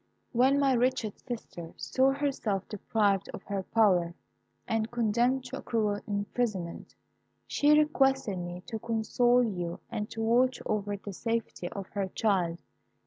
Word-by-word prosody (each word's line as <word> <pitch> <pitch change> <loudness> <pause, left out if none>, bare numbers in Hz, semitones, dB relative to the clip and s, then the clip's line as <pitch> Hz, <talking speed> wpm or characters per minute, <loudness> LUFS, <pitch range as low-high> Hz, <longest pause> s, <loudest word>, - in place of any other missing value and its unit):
"When 260 +4 +4
my 275 -2 +4
wretched 245 -3 0
sister 175 -9 -7
saw 265 +1 +2
herself 265 -9 -1
deprived 200 -2 0
of - - -10
her 200 -1 -3
power 185 -5 +2 0.5
and 225 0 0
condemned 240 +3 +1
to 260 +2 -5
a - - -8
cruel 210 -3 0
imprisonment, 200 -3 -3 0.5
she 295 +1 +4
requested 270 -9 +2
me 175 +1 -6
to 225 -3 -5
console 240 +2 +2
you 175 -6 -3
and 210 0 -3
to 225 - -4
watch 245 +3 +3
over 205 -1 -1
the 200 0 -8
safety 225 -4 -3
of 195 -2 -6
her 200 -2 -2
child. 185 -4 0
220 Hz, 140 wpm, -29 LUFS, 195-245 Hz, 0.5 s, When